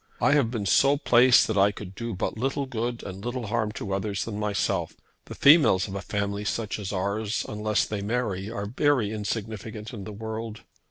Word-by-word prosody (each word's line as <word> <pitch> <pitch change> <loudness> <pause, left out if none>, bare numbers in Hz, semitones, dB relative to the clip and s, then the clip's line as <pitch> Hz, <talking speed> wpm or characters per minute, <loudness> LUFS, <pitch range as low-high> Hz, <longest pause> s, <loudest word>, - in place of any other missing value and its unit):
I - - +3
have 140 -6 +3
been 115 -4 -3
so 140 +8 +4
placed 125 -3 +5
that 110 -3 0
I 100 +1 +5
could 100 -2 -9
do 115 +1 -5
but - - -2
little 135 +4 -1
good 120 -1 -3
and 95 0 -8
little 120 0 -3
harm 105 0 -1
to 100 -2 -4
others 100 0 -2
than 105 -2 -5
myself. 105 -1 -1 0.3
The - - -9
females 140 - +6
of 95 - -7
a 100 - -4
family 100 +1 -2
such 110 +1 -2
as 100 -2 -4
ours, 100 +3 -1
unless 105 0 0
they 105 -2 -4
marry, 105 -3 -2
are 100 -3 -4
very 125 -1 +1
insignificant 110 0 -5
in 100 -4 -7
the 110 - -7
world. 110 +1 -6
110 Hz, 200 wpm, -26 LUFS, 100-120 Hz, 0.3 s, females